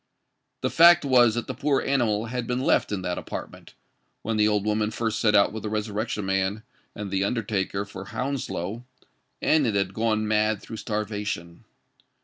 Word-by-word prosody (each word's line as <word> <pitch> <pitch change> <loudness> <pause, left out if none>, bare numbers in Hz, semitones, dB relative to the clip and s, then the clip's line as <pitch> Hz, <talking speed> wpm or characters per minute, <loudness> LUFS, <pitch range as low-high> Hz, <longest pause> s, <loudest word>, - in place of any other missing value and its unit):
The - - -1
fact 170 -1 +7
was 120 -4 +5
that 120 - -2
the 130 - -4
poor 140 +1 +1
animal 115 -6 +1
had 120 0 -4
been 125 0 -1
left 130 - +2
in 100 -3 -2
that 90 -1 -2
apartment, - - -8 0.5
when 115 - -1
the 105 0 +3
old 105 -1 +1
woman 105 0 +1
first 110 -1 -2
set 105 -1 +3
out 100 0 +4
with 110 - -5
the 105 - -4
Resurrection 105 0 -2
Man 95 +2 -1 0.3
and 105 -2 -6
the 95 0 +1
undertaker 100 -2 -1
for 100 -1 -9
Hounslow; 115 -3 -4 0.6
and 155 -4 +3
it 110 - 0
had 95 -1 0
gone 110 -1 0
mad 105 -1 +2
through 110 - -9
starvation. 105 -6 -4
110 Hz, 175 wpm, -25 LUFS, 100-115 Hz, 0.6 s, fact